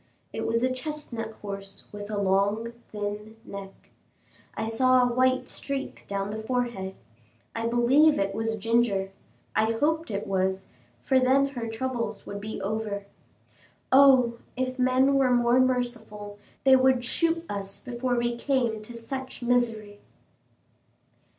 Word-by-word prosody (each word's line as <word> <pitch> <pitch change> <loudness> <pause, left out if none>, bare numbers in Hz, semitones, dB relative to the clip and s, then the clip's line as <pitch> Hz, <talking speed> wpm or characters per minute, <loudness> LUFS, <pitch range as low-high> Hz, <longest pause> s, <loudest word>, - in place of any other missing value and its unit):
It - - -3
was 230 +1 +1
a 255 0 +2
chestnut 255 -5 -5
horse 195 -1 -7
with 205 0 -7
a 210 - -2
long, 200 +4 +1 0.2
thin 210 +1 -5
neck. 195 -1 -10 0.6
I 220 - -2
saw 255 +3 +4
a 245 -1 +1
white 255 +1 +2
streak 275 -1 -5
down 200 0 -2
the 220 +1 -4
forehead. 235 -5 -2 0.6
I 230 0 -1
believe 265 +6 +4
it 195 0 0
was 225 0 -1
Ginger; 215 -3 +1 0.4
I 220 +1 +2
hoped 315 +7 0
it 205 -1 -3
was, 190 0 -1 0.3
for 265 - +3
then 270 +2 +3
her 240 -4 -5
troubles 240 +1 -3
would 200 0 -6
be 215 +1 -5
over. 205 -1 -3 0.9
Oh! 260 -3 +6 0.2
if 255 0 -2
men 255 +2 +4
were 270 -2 +3
more 240 +1 +4
merciful, 230 -5 -1 0.2
they 265 -1 +7
would 260 -1 +3
shoot 330 +5 +1
us 200 -1 -1
before 250 0 -2
we 240 0 0
came 235 -4 0
to 235 +3 -10
such 260 +2 -6
misery. 225 -4 0
235 Hz, 140 wpm, -27 LUFS, 205-255 Hz, 0.9 s, they